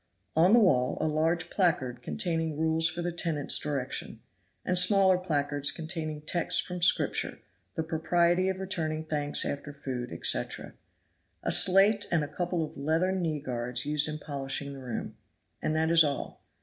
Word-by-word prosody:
On 170 +4 +5
the 240 - +7
wall 130 - +2
a - - 0
large 165 +3 0
placard 130 -10 0
containing 165 +1 -2
rules 160 0 +2
for 170 +2 -5
the 175 - -2
tenant's 165 -4 +1
direction, 140 -4 -4 0.5
and 180 - 0
smaller 185 0 +5
placards 145 -5 +1
containing 155 -2 -5
texts 170 +2 +1
from 180 -1 -4
Scripture, 170 -1 +1 0.4
the 160 - -1
propriety 170 +3 +1
of 190 - -2
returning 160 -5 -3
thanks 145 -2 0
after 145 +1 -4
food, 130 - -6
etc.; 80 - -1 0.7
a - - 0
slate 200 +3 +4
and 165 -3 +2
a - - -4
couple 175 +3 -2
of - - -13
leathern 165 +6 0
kneeguards 125 -6 -2
used 150 +1 +1
in 155 - -4
polishing 140 -1 -3
the 135 - -9
room. 125 -3 -6 0.4
And 155 - -1
that 160 +1 +1
is 165 -1 +7
all. 145 -2 -4
160 Hz, 160 wpm, -28 LUFS, 145-175 Hz, 0.7 s, the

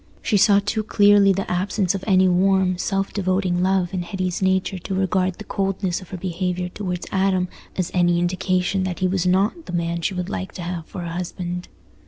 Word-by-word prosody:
She 215 - +1
saw 200 0 +5
too 215 +1 0
clearly 205 -1 +5
the 195 +1 -1
absence 185 +1 0
of 195 - -4
any 190 -2 +5
warm, 185 0 +2
self 195 0 -1
devoting 185 -2 0
love 185 -1 +1
in 185 - -1
Hetty's 185 0 -3
nature 190 0 +1
to 190 +2 -4
regard 190 -1 +1
the 215 - -9
coldness 195 -3 -2
of 185 - -13
her 185 - -6
behaviour 180 0 -2
towards 180 -2 -4
Adam 190 -1 +1 0.3
as 185 -2 -2
any 175 -1 +3
indication 185 +2 0
that 185 -2 -3
he 185 - +1
was 185 -1 0
not 200 - +1
the - - -6
man 170 0 -1
she 185 +3 -1
would 180 -1 -3
like 95 0 -5
to 180 - -6
have 170 -2 -5
for 185 -3 -7
a 170 - -4
husband. 175 +1 -4
185 Hz, 205 wpm, -22 LUFS, 180-195 Hz, 0.3 s, saw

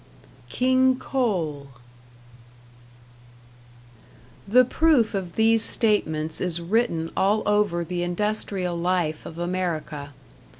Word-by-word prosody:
#King 260 - +2
Coal# 175 - -2 2.8
The 250 +5 +5
proof 275 -5 +2
of 185 -4 -4
these 225 0 +3
statements 160 -11 0
is 175 -2 +1
written 170 -3 -1
all 205 +3 +2
over 205 -5 +1
the 175 +1 -4
industrial 185 0 -2
life 170 -3 -1
of 160 - -10
America. 170 -5 -3
185 Hz, 90 wpm, -24 LUFS, 170-220 Hz, 2.8 s, The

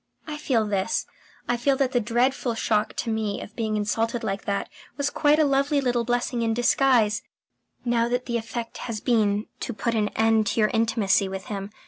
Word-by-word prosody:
I 305 - -5
feel 245 -7 +1
this: 200 +7 -1 0.4
I 245 - +1
feel 270 +3 +2
that 265 -2 +1
the 245 - +2
dreadful 240 +1 0
shock 215 -1 0
to 230 - -2
me 220 -2 -1
of 210 - -10
being 220 -2 -1
insulted 225 +3 -1
like 195 0 -3
that 200 -1 -1 0.3
was 285 0 0
quite 295 -1 +3
a 310 - +4
lovely 280 +1 +2
little 245 -3 +1
blessing 245 0 0
in 225 -1 +1
disguise, 240 -3 +3 0.6
now 235 -1 +2
that 245 +1 -1
the 235 -2 -1
effect 230 +1 -5
has 220 -2 -3
been 210 -3 +1
to 240 - -4
put 230 +3 -1
an 215 -2 +1
end 220 -1 +3
to 210 +3 0
your 215 -1 +4
intimacy 225 -4 +2
with 190 0 -6
him. 195 0 -4
230 Hz, 195 wpm, -25 LUFS, 215-250 Hz, 0.6 s, a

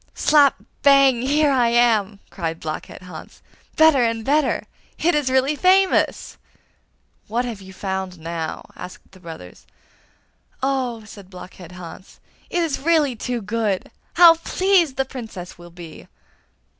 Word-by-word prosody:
'Slap! 290 -3 +4 0.3
bang! 275 -3 +5
here 290 +3 +2
I 250 -3 +2
am!' 225 -4 +2
cried 165 -3 -4
Blockhead 155 +3 -7
Hans; 180 -4 -12 0.3
'better 315 -4 +5
and 230 -1 -1
better 295 +1 +1 0.3
it 345 +2 +1
is 295 -4 0
really 265 +3 +1
famous!' 375 +4 +2 0.9
'What 235 +3 -1
have 225 -5 -6
you 190 0 -12
found 190 -1 -5
now?' 165 0 -6
asked 180 - -11
the 190 - -17
brothers. 160 - -12 1.0
'Oh,' 255 -4 -2
said 200 -3 -13
Blockhead 180 -1 -12
Hans, 180 +1 -12 0.3
'it 350 - 0
is 310 -4 -2
really 300 -4 +1
too 240 0 -4
good! 210 -2 -2 0.2
How 345 -1 +8
pleased 350 -3 +1
the 270 - 0
Princess 220 -10 -9
will 175 0 -12
be! 170 -2 -12
235 Hz, 135 wpm, -21 LUFS, 185-280 Hz, 1.0 s, How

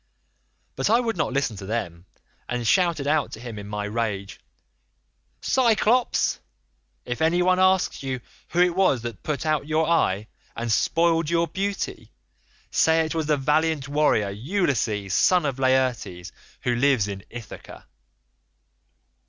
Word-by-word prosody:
"But - - 0
I 230 +2 +5
would 230 -2 -1
not 160 - -1
listen 135 -5 -1
to 95 - -8
them, 90 -6 -4 0.4
and 120 -1 -2
shouted 170 - +2
out 150 0 +1
to - - -7
him 115 -3 -7
in 100 - -8
my 105 0 -4
rage, 105 -3 -3 1.0
'Cyclops, 240 -1 +2 0.7
if 120 +4 -4
any 170 +3 +3
one 185 0 +3
asks 185 0 +2
you 130 -2 -3 0.3
who 175 - +1
it 180 -1 +3
was 185 -11 +2
that 115 -5 -6
put 150 0 -3 0.2
your 155 +2 +1
eye 105 - +2
out - - -15 0.3
and 115 0 -3
spoiled 165 +5 +2
your 170 0 +1
beauty, 200 +2 -4 0.6
say 160 0 +3
it 155 - -4
was 160 -2 -2
the 150 -1 +2
valiant 150 +1 +1
warrior 145 -9 +2
Ulysses, 110 - -1
son 180 -3 +3
of 135 -2 -2
Laertes, 130 -10 0 0.3
who 125 - +1
lives 125 -4 +2
in 100 -1 -6
Ithaca. 120 -3 -10
140 Hz, 145 wpm, -24 LUFS, 115-170 Hz, 1.0 s, I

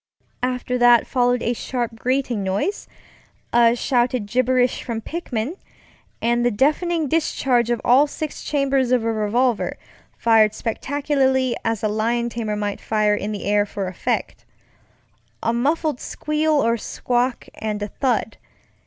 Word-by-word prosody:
After 250 0 -1
that 240 -1 +6
followed 245 -1 +1
a 235 - +1
sharp 240 -1 -3
grating 255 -3 0
noise, 195 - -2 0.7
a 235 0 +5
shouted 245 -2 0
gibberish 250 +2 +1
from 230 -2 -4
Pickman, 280 - -4 0.7
and 240 +1 +2
the 245 - +3
deafening 305 - +1
discharge 260 -6 +1
of 240 - +1
all 265 +5 +5
six 305 +1 -6
chambers 275 -3 +1
of 250 -3 +3
a 230 0 0
revolver, 225 +3 0 0.4
fired 220 -2 +4
spectacularly 265 0 0
as 225 -2 -1
a - - +3
lion 230 +3 0
tamer 220 -2 -3
might 205 -1 -3
fire 215 -1 +1
in 210 0 -2
the 205 - -5
air 205 +1 +3
for 200 -1 -5
effect. 185 -1 -3 1.0
A 230 - +1
muffled 290 +3 0
squeal 305 +1 -1
or 235 -5 +2
squawk, 245 +3 -1
and 210 -1 -4
a - - -2
thud. 235 -1 -1
240 Hz, 140 wpm, -22 LUFS, 220-265 Hz, 1.0 s, that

